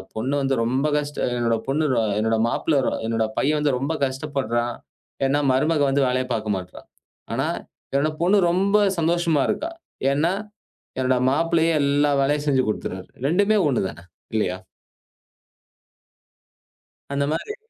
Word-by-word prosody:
பொண்ணு 125 +6 -2
வந்து 135 0 +1
ரொம்ப 130 +5 +1
கஷ்ட 145 0 -3
அ - - -1
என்னோட 115 -1 +1
பொண்ணு 150 +3 +1
ரொ 115 - +2 0.2
என்னோட 110 +1 +1
மாப்பிள்ளை 145 +4 +1
ரொ - - +1
என்னோட 115 0 0
பையன் 150 +2 +2
வந்து 145 -3 +1
ரொம்ப 140 +5 -2
கஷ்டப்படுறான். 130 -4 -2 0.5
ஏன்னா 140 +2 +2
மருமக 150 +4 +2
வந்து 140 +1 +2
வேலையப் 130 0 -1
பாக்க 110 -1 -3
மாட்ர்றா! 90 -1 -7 0.5
ஆனா - - 0 0.5
என்னோட 145 +3 +2
பொண்ணு 190 +4 +4
ரொம்ப 195 +3 +2 0.2
சந்தோஷமா 165 -2 +2
இருக்கா. 325 +3 -2 0.4
ஏன்னா, 155 +5 +2 0.7
என்னோட 130 0 +2
மாப்பிள்ளையே 165 +3 +2
எல்லா 145 +1 +2
வேலையும் 145 +2 +1
செஞ்சு 130 -2 +3
குடுத்துடுறாரு. 95 -3 -4 0.2
2மே 200 +7 +3
ஒண்ணுதானே! 95 - -2 0.3
இல்லையா? 95 -4 0 2.6
அந்த 140 0 +1
மாதிரி 420 - -4
140 Hz, 135 wpm, -23 LUFS, 120-155 Hz, 2.6 s, பொண்ணு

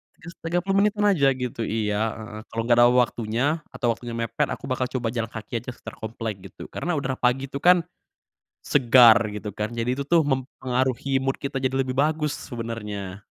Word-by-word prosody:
Tigas 170 +1 -11
Tiga 175 +2 +1
puluh 195 +1 0
menitan 210 0 +2
aja 145 -8 +3
gitu, 125 -3 -4
iya 110 0 -1
heeh. 110 -1 -8
Kalau 115 - -2
gak 120 - +5
ada 120 - +8
waktunya 120 0 +1 0.3
atau 120 - -2
waktunya 120 0 -8
mepet 115 -1 -1
aku 140 - -8
bakal 130 0 0
coba 125 -2 -2
jalan 115 -1 -2
kaki 110 +1 -5
aja 125 - -9
sekitar - - -10
komplek 110 -2 -5
gitu. - - -10
Karena 175 +4 -3
udara 130 -3 -2
pagi 130 +2 +1
itu 140 - -4
kan 180 +3 +5 0.8
segar 120 -4 +7 0.2
gitu 105 0 -5
kan, 105 +4 -4
jadi 120 +1 -1
itu 140 - -2
tuh 170 0 +5
mempengaruhi 130 0 -1
mood 135 0 -1
kita 135 -1 -3
jadi 130 0 -1
lebih 130 - -3
bagus 150 0 +1 0.2
sebenernya, 105 -5 -5
125 Hz, 190 wpm, -24 LUFS, 115-140 Hz, 0.8 s, ada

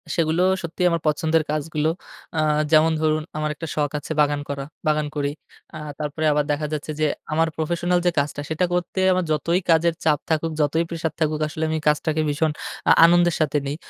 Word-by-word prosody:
সেগুলো 165 +1 +1 0.2
সত্যিই 175 +2 0
আমার 170 -1 -1
পছন্দের 160 +1 +2
কাজগুলো 155 0 -1 0.5
আ - - +2 0.3
যেমন 160 +1 +5
ধরুন 155 0 +1
আমার 155 0 -1
একটা 165 - -6
শখ 150 -1 0
আছে 145 - -9
বাগান 145 0 +1
করা 140 -1 -4 0.2
বাগান 150 -1 +1
করি। 145 -1 -1 0.4
আ - - -5 0.2
তারপরে 155 +1 -3
আবার 150 0 +2
দেখা 150 +1 -1
যাচ্ছে 155 0 -4
যে 155 - +2 0.3
আমার 165 +1 +2
প্রফেশনাল 175 +3 0
যে 175 - +4
কাজটা 145 0 -2
সেটা 160 +3 +1
করতে 180 +1 -2
আমার 185 -1 0
যতই 165 +4 +1
কাজের 165 +1 +3
চাপ 150 -2 +3
থাকুক, 160 +1 0
যতই 160 +3 +2
প্রেসার 165 -1 -3
থাকুক 155 -1 0
আসলে 155 +1 -5
আমি 160 - 0
কাজটাকে 155 +1 +1
ভীষণ 155 +1 +1 0.4
আ - - +8
আনন্দের 175 0 +4
সাথে 150 -1 +1
নেই। 145 - -2
155 Hz, 190 wpm, -23 LUFS, 150-165 Hz, 0.5 s, আ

